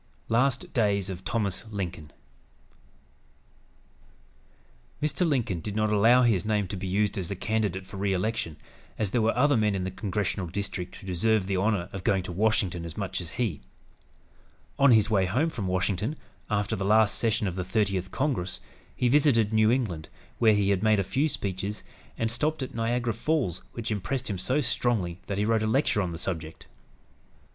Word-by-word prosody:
LAST 135 +9 +1
DAYS 100 -6 +1
OF 90 - -6
THOMAS 105 0 -2
LINCOLN 90 -7 -5 2.9
Mr. 155 +4 +1
Lincoln 120 - 0
did 105 +4 -5
not 110 0 +1
allow 115 +5 +5
his 110 -7 +3
name 105 -2 +1
to 100 - -4
be 95 0 -4
used 100 +2 +1
as 90 - -4
a 100 - -2
candidate 100 -2 -1
for 95 +1 -9
re 100 0 0
election, 95 -4 -1 0.4
as 105 -3 -1
there 120 - +2
were 115 +2 +1
other 145 +2 +4
men 105 -3 +2
in 95 - -2
the 95 - -3
congressional 100 -1 -2
district 95 0 -4
who - - -12
deserved 95 +2 +1
the 100 - 0
honor 100 -2 +1
of 95 -2 -6
going 95 -1 +2
to 90 - -6
Washington 95 -3 +1
as 85 -1 -7
much 95 -2 -3
as 85 - -6
he. 110 - -1 1.2
On 140 0 +6
his 110 -3 +5
way 95 -3 +3
home 140 - +1
from 105 -9 -4
Washington, 95 - -1 0.3
after 105 -2 0
the 100 - -3
last 105 +1 +4
session 110 -2 0
of 90 -3 -2
the 95 - -2
Thirtieth 95 -1 0
Congress, 125 -8 -1 0.4
he 125 - +1
visited 120 -5 +3
New 110 0 +4
England, 110 -11 -1 0.3
where 110 -2 +5
he 100 -1 +3
made 110 +1 +3
a - - +2
few 135 - 0
speeches, 100 -3 -4 0.3
and 115 0 0
stopped 150 +4 0
at 130 - -6
Niagara 115 +1 0
Falls, 120 - -1
which 115 -1 -4
impressed 120 +4 -2
him 95 - -3
so 130 +10 +1
strongly 110 -9 0
that 100 - -2
he 105 - +1
wrote 110 0 +2
a 110 - 0
lecture 110 -2 +2
on 90 -3 -2
the 85 - -5
subject. 80 -3 -5
105 Hz, 185 wpm, -27 LUFS, 95-115 Hz, 2.9 s, On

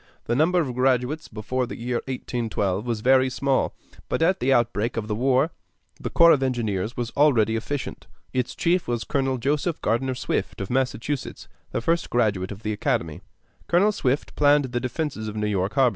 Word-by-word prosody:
The 120 - 0
number 170 +6 +3
of 140 -7 -1
graduates 130 +4 +1
before 120 +4 -3
the - - -6
year 120 +1 -2
1812 115 -5 -2
was 115 -3 -1
very 130 +2 +4
small; 135 +1 0 0.3
but - - +1
at 185 +3 +3
the 135 - +1
outbreak 120 -2 +1
of 110 -2 -2
the 110 - -1
war 130 +7 +2 0.5
the - - -4
corps 170 0 +6
of 140 - +4
engineers 115 -5 -1
was 120 -1 -2
already 120 -7 +3
efficient. 135 +5 -4 0.3
Its 125 -1 -1
chief 180 0 +1
was 120 -1 -1
Colonel 135 -2 0
Joseph 145 +6 -1
Gardner 130 +3 0
Swift, - - -2
of 95 +2 -4
Massachusetts, 130 +1 -2 0.2
the - - -2
first 165 +6 0
graduate 105 -6 +1
of 100 +2 -9
the 110 - -1
academy: 105 - -1 0.5
Colonel 190 +5 +4
Swift 140 -9 -1
planned 145 -1 +4
the 125 -1 -2
defenses 130 -2 -3
of 105 - -5
New 105 0 -1
York 100 -1 0
Harbor. 135 -3 +5
125 Hz, 185 wpm, -24 LUFS, 110-140 Hz, 0.5 s, corps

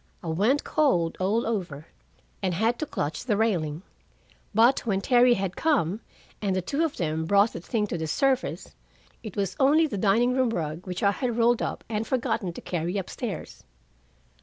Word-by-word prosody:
I 165 - -4
went 210 - +2
cold 215 - +1
all 205 +5 +1
over, 175 -10 -3 0.6
and 185 -3 0
had 225 +6 +1
to 310 - -2
clutch 150 - -3
the 215 -5 0
railing. 175 -7 0 0.7
But 230 +5 +4
when 200 -5 -1
Terry 245 +3 +4
had 190 -3 -3
come, 225 - +1 0.4
and 195 -3 0
the 185 - 0
two 290 - -1
of 320 -3 -2
them 160 -1 -1
brought 200 +4 +4
the - - -5
thing 210 +4 -1
to 175 -4 -4
the 160 - -3
surface, 265 - 0 0.5
it 215 -5 -8
was 195 -2 -2
only 295 +4 +5
the 235 -10 -3
dining 225 +5 +3
room 255 -1 +2
rug, 165 -3 -4
which 180 +2 -4
I 200 - +5
had 240 +2 -2
rolled 235 0 +3
up - - -3
and 220 0 -3
forgotten 230 -7 -1
to - - -9
carry 175 +2 -2
up 190 - -4
stairs! 230 -6 -6
210 Hz, 185 wpm, -26 LUFS, 180-245 Hz, 0.7 s, only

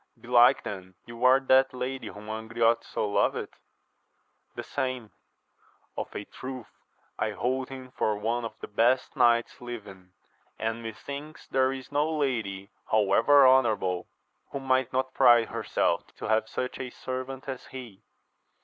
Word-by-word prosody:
Belike 120 0 +5
then, 95 -2 -7
you 115 +1 -8
are 130 +1 +7
that 130 -1 +3
lady 130 +1 -4
whom 105 +1 -10
Angriote 115 +2 0
so 105 - -2
loveth? 100 - 0 0.6
— - - -44
The - - -5
same. 130 -5 -3 0.4
— - - -36
Of - - -5
a 105 - -4
truth, 130 -2 -8 0.5
I - - 0
hold 130 +1 -1
him 130 -1 -9
for 105 -4 0
one 115 +3 -1
of 110 -2 -5
the - - -6
best 120 +5 +2
knights 120 -1 +3
living, 100 -7 -9 0.4
and 115 +1 -2
methinks 140 +7 -8
there 130 0 +2
is 135 0 -7
no 150 +2 +1
lady, 110 -9 -2 0.2
however 130 +6 +5
honour 130 -3 +5
able, 90 -3 -3 0.4
who 140 - -4
might 130 -1 +1
not 130 0 -1
pride 120 -3 +5
herself - - 0
to - - -7
have 110 0 +1
such 125 0 -4
a 130 -1 -4
servant 130 +2 -6
as 130 -2 -6
he. 120 -7 -10
120 Hz, 155 wpm, -28 LUFS, 110-130 Hz, 0.6 s, are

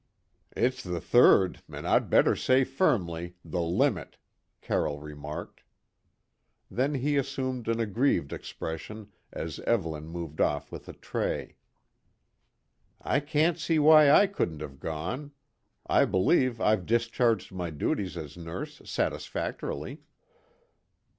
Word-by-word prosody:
"It's 125 +1 +1
the 90 -4 -4
third 95 -1 +4
and - - -6
I'd - - +2
better - - +4
say 130 +1 +3
firmly, 90 - 0
the 85 +2 -2
limit," 90 - 0 0.4
Carroll 75 -1 -1
remarked. 75 0 -8 1.1
Then 135 +4 0
he 140 +2 0
assumed 130 -3 -2
an 115 0 0
aggrieved 110 - +1
expression 105 +6 -7 0.2
as - - -5
Evelyn 80 -9 -1
moved 80 -2 -5
off 75 - 0
with - - -9
a - - -7
tray. - - -3 1.4
"I - - +1
can't 155 +3 +1
see 165 0 +1
why 155 -1 +7
I 175 +8 +7
couldn't 85 - -3
have 70 -3 -8
gone. 95 - -4 0.5
I - - +4
believe 120 - +2
I've 105 -5 +1
discharged 115 -2 +1
my 90 -2 -4
duties 90 +4 -2
as 75 -3 -7
nurse 90 - -7
satisfactorily." - - -3
105 Hz, 120 wpm, -28 LUFS, 85-135 Hz, 1.4 s, why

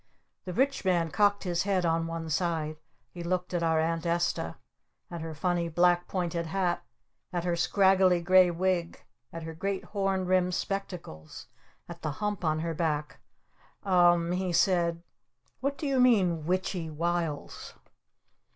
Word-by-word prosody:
The 180 - -5
Rich 275 +7 +1
Man 175 -4 +1
cocked 205 +3 +2
his 175 -2 0
head 190 -3 0
on 165 0 +1
one 165 0 -5
side. 160 -1 -1 0.3
He 175 - -8
looked 180 +1 -2
at 175 - 0
our 160 -1 +2
Aunt 165 +1 0
Esta. 170 - -1 0.6
At 170 -1 -5
her 160 -1 -6
funny 175 +1 0
black 175 +1 +3
pointed 175 -2 -2
hat. 180 0 -1 0.5
At 175 -2 -2
her 175 -1 0
scraggly 190 0 +4
gray 185 +1 +5
wig. 175 0 -1 0.3
At 165 -1 -7
her 160 0 -6
great 195 +4 -3
horn 195 -2 -1
rimmed 180 -1 +2
spectacles. 180 - -5 0.4
At 170 0 -10
the 155 -2 -3
hump 210 +2 -3
on 155 -1 +1
her 165 0 -2
back. 150 -3 -2 0.7
"U 195 - -3
m 175 -1 +4
m," 180 - -1
he 185 -1 -1
said. 170 -1 +2 0.6
"What 280 +1 -2
do 295 - -5
you 275 -2 +1
mean, 185 -11 +3
'witch 185 +2 0
y 165 -4 -4
wiles?'" 165 -1 -3
175 Hz, 160 wpm, -29 LUFS, 165-185 Hz, 0.7 s, gray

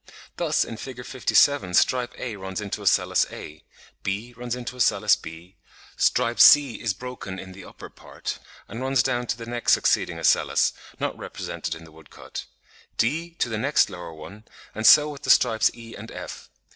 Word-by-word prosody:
Thus - - +1
in 115 - -8
Fig. 125 0 -8
57 130 -6 +2
stripe 125 +4 +2
A 120 -4 -5
runs 95 -1 -7
to 105 -2 -4
ocellus - - +2
a; 75 +1 -10 0.4
B 105 +5 -4
runs 120 0 -4
to 125 - -7
ocellus 105 -4 +3
b; 80 +3 -12 0.4
stripe 120 -1 +1
C 145 -5 +7
is 110 -5 -1
broken 125 -6 -7
in 95 0 -9
the 95 +1 -11
upper - - -11
part, - - -8 0.3
and 115 - -7
runs 130 -2 +2
down 125 -2 -1
to 115 - -2
the 115 - -8
next 120 0 +1
succeeding - - +1
ocellus, - - +2 0.3
not - - -2
represented - - -5
in 80 - -12
the 80 - -15
woodcut; 80 -2 -10 0.5
D 165 +8 -1
to - - 0
the 110 -2 -3
next 140 +5 +2
lower 85 -2 -8
one, 100 +8 -12 0.3
and 110 +1 +1
so 150 0 +8
with 140 -2 -10
the - - -6
stripes 110 -1 +4
E 115 -1 -11
and 110 +2 -10
F. - - -9
115 Hz, 180 wpm, -24 LUFS, 95-125 Hz, 0.5 s, so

